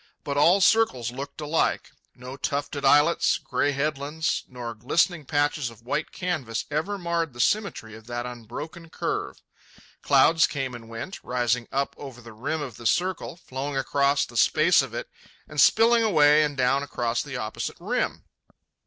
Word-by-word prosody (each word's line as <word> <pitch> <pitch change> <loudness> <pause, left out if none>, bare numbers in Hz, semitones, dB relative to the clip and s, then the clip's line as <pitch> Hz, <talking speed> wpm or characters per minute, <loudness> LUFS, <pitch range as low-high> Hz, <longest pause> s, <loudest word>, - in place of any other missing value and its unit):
But 140 - -3
all 170 +7 +5
circles 185 - +3
looked 140 +4 -7
alike. 150 +2 0 0.2
No 125 +2 -9
tufted 140 +1 -3
islets, 145 +4 +4
gray 145 0 -1
headlands, 150 +2 -2
nor 120 -2 -6
glistening 155 - 0
patches 145 -2 0
of 115 -1 -16
white 150 +6 -2
canvas 150 -11 -3
ever 160 +8 -1
marred 170 -5 -2
the 120 - -13
symmetry 120 - 0
of 110 0 -14
that 120 0 -4
unbroken 125 +8 -8
curve. - - -4 0.6
Clouds 165 -1 +5
came 135 -3 -4
and 115 -2 -10
went, 115 +12 -7
rising 120 -1 0
up 140 +1 -1
over 135 -4 -9
the 115 -2 -12
rim 145 +8 -3
of 120 -7 -8
the 120 - -2
circle, 185 +2 0
flowing 140 -3 -5
across 140 +1 +2
the - - -9
space - - +4
of - - -6
it, - - -4 0.4
and - - 0
spilling 230 +1 +5
away 155 -8 +5
and 145 -2 -1
down 130 +2 +2
across 120 -4 -2
the 135 -3 -6
opposite 110 -2 -4
rim. - - -2
140 Hz, 160 wpm, -25 LUFS, 125-160 Hz, 0.6 s, all